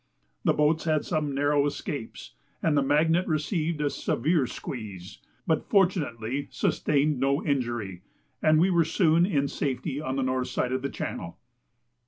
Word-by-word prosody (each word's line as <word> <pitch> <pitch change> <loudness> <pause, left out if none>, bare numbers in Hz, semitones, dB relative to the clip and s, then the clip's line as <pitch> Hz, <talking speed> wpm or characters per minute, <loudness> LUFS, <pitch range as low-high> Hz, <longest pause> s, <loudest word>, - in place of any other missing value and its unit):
The - - +3
boats 150 +2 +2
had 155 -2 +1
some 150 -4 -1
narrow 145 0 +2
escapes, 140 -4 -6 0.3
and 160 -2 +2
the 140 - +4
Magnet 160 +6 +2
received 155 0 -1
a 145 - +1
severe 150 +1 0
squeeze, 100 -10 -7 0.3
but - - 0
fortunately 145 - +1
sustained 145 -1 +1
no 140 +2 +1
injury, 120 - -2 0.4
and 155 0 +4
we 185 +3 +4
were 170 -2 +4
soon 165 +1 +3
in 140 -7 +1
safety 135 0 -3
on 130 -3 -3
the 135 - 0
north 130 0 0
side 125 - -1
of 130 0 -1
the 140 - -2
channel. 85 - -5
145 Hz, 155 wpm, -27 LUFS, 130-155 Hz, 0.4 s, the